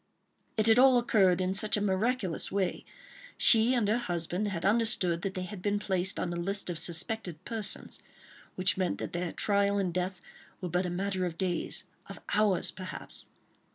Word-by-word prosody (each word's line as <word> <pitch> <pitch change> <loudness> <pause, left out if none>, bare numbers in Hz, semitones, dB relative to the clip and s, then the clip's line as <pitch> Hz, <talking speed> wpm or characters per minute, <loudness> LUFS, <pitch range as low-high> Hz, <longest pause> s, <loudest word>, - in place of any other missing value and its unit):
It 215 - +2
had 225 +1 +5
all 260 -1 +7
occurred 195 -7 +3
in 185 0 0
such 210 +2 0
a - - 0
miraculous 205 -1 -1
way; 195 -2 -1 0.5
she 230 +2 +6
and 230 -4 +1
her 220 +4 +2
husband 175 -1 -2
had 180 -4 -3
understood 200 -5 +2
that 190 0 -4
they 185 - -3
had 185 0 -8
been 205 +1 0
placed 190 -2 0
on 175 - -2
the 175 - -3
list 195 +1 -2
of 165 - -3
"suspected 175 0 -2
persons," 225 -3 -2 0.5
which 185 0 +1
meant 185 -2 0
that - - -6
their 175 0 -2
trial 200 0 +1
and 185 -3 -1
death 180 +1 -2 0.4
were 180 - -4
but 180 +2 0
a - - -3
matter 190 +1 -2
of 165 -1 -7
days—of 185 +1 -4
hours, 205 -3 +2
perhaps. 185 0 -8
190 Hz, 180 wpm, -30 LUFS, 180-210 Hz, 0.5 s, all